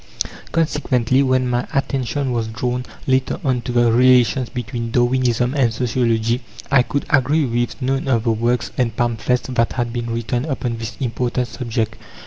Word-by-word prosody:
Consequently, 135 -6 +1
when 130 -1 +2
my 125 0 -1
attention 135 -1 -1
was 115 -2 -1
drawn, 125 +2 -3 0.2
later 130 0 +1
on, 130 -3 +1
to 125 - -4
the 120 -1 +3
relations 125 +1 +4
between 120 -2 -4
Darwinism 120 0 +2
and 130 -6 +2
Sociology, 115 0 0 0.3
I 135 -2 +6
could 140 +3 -2
agree 145 +2 +3
with 120 +1 -1
none 135 +1 0
of 115 -4 +2
the 115 - +2
works 120 +2 0
and 115 -3 0
pamphlets 120 +1 0
that 115 -2 +1
had 120 -2 -2
been 120 -1 -3
written 115 +2 -2
upon 125 -5 -2
this 115 -1 -6
important 125 0 -1
subject. 115 -3 -3
125 Hz, 160 wpm, -20 LUFS, 115-130 Hz, 0.3 s, I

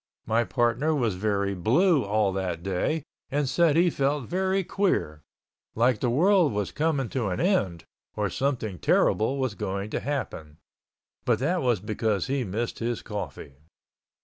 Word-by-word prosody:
My 115 +2 +2
partner 120 +7 +1
was 120 -7 +1
very 100 0 0
blue 135 - +3
all 105 -1 +1
that 90 -3 -3
day 100 - -1 0.3
and 145 0 0
said 155 +3 +3
he 175 +1 +4
felt 140 -1 0
very 190 +1 0
queer, 165 - -1 0.5
like 120 0 +3
the 125 - 0
world 170 - +4
was 105 -1 -2
coming 150 -4 0
to 125 -5 -1
an 90 - -2
end 100 - +1 0.3
or 105 -1 0
something 115 -6 -2
terrible 120 +6 +2
was 130 -4 -1
going 100 +1 -4
to - - -1
happen. 105 - -4 0.7
But 120 -3 +2
that 165 +9 0
was 120 -6 +2
because 105 -1 -1
he 135 0 -1
missed 115 +3 -3
his 120 0 -2
coffee. 100 -9 -6
120 Hz, 155 wpm, -26 LUFS, 100-145 Hz, 0.7 s, he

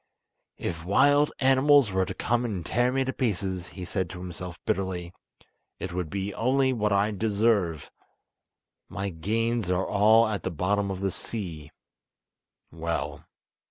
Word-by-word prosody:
"If 85 -2 -4
wild 145 - +4
animals 135 -2 +5
were 95 -1 +1
to - - -5
come 120 +1 0
and 100 -8 -3
tear 120 +2 +2
me 135 0 +1
to 130 - -2
pieces," 95 -6 -2
he 95 -2 -8
said 95 -1 -2
to 90 - -8
himself 90 -1 -7
bitterly, 90 -2 -2 0.6
"it 90 -2 -5
would 90 -3 -3
be 100 +2 -3
only 130 +2 +2
what 105 -3 0
I 100 +2 +2
deserve! 105 -5 +1 1.0
My 100 +1 -3
gains 110 +5 -1
are 90 +1 +1
all 110 +3 +5
at 105 -2 -2
the - - -2
bottom 100 +4 0
of 95 -1 -4
the 95 -1 0
sea—well! 85 -2 -7
100 Hz, 145 wpm, -27 LUFS, 90-115 Hz, 1.0 s, animals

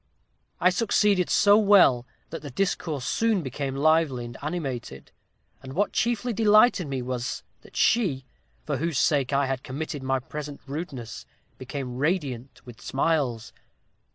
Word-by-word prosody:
I 180 +2 +4
succeeded 200 -2 +2
so 205 +1 +5
well 185 - +5 0.2
that 165 - -6
the 145 - -7
discourse 160 -3 -2
soon 225 -5 +1
became 135 0 -4
lively 150 -4 +2
and 120 0 -9
animated; 135 - -5 0.5
and 130 0 -9
what 205 +6 0
chiefly 240 +1 0
delighted 215 -3 +4
me 135 -2 -3
was, 125 0 -4 0.2
that - - -18
she, 165 - +2 0.4
for 145 -2 -1
whose 165 -1 -2
sake 140 -3 +2
I 140 0 +2
had 130 -1 -2
committed 145 +2 -5
my 135 0 0
present 145 +2 -7
rudeness, 135 - -7 0.3
became 130 -1 -5
radiant 140 -5 -2
with 120 -3 -12
smiles. 135 -6 -1
145 Hz, 140 wpm, -26 LUFS, 130-180 Hz, 0.5 s, so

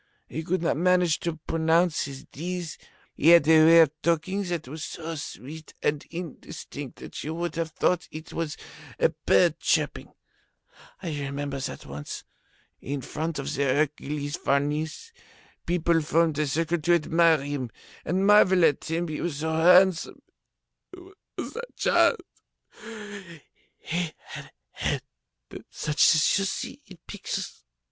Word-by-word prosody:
He 160 - -5
could 170 +2 -1
not 165 - +1
manage 180 -1 +3
to 170 -2 -3
pronounce 165 +1 +2
his 135 0 -8
Ds. 175 +1 -5 0.3
He 150 - 0
had 170 -3 +7
a 160 -1 +7
way 165 +1 +8
of 155 -4 +4
talking 170 +4 0
that 170 -6 -3
was 155 +4 -7
so 165 0 -5
sweet 155 0 -8
and 145 -1 0
indistinct 160 -5 -8
that - - -8
you 155 +2 -4
would 170 +1 -3
have 165 -1 -2
thought 180 +2 0
it 155 +1 -9
was 165 -2 -3 0.4
a - - +4
bird - - +2
chirping. - - 0 0.9
I 175 - -3
remember 140 0 -4
that 135 - -6
once, 75 +1 -7 0.6
in 140 0 -4
front 160 +4 -4
of 140 - -3
the 140 - -2
Hercules 145 +1 -1
Farnese, 150 - -1 0.6
people 170 -1 +2
formed 160 0 +1
a 150 - +1
circle 165 +4 0
to 175 +3 +3
admire 165 -2 +3
him 140 -4 -3 0.3
and 185 +4 0
marvel 190 -4 +6
at 145 - +2
him, 170 +2 -1
he 155 -1 -4
was 170 -5 -2
so 160 +2 -2
handsome, 180 +2 +4 1.2
was - - -5
that 475 +1 -8
child! - - +3 1.6
He 170 -1 -3
had - - -9
a - - -19 0.2
head - - -2 0.7
such 150 +2 +3
as 155 +5 +3
you 195 - 0
see 195 +8 -4
in 185 - -13
pictures. 195 - -5
160 Hz, 145 wpm, -26 LUFS, 150-175 Hz, 1.6 s, way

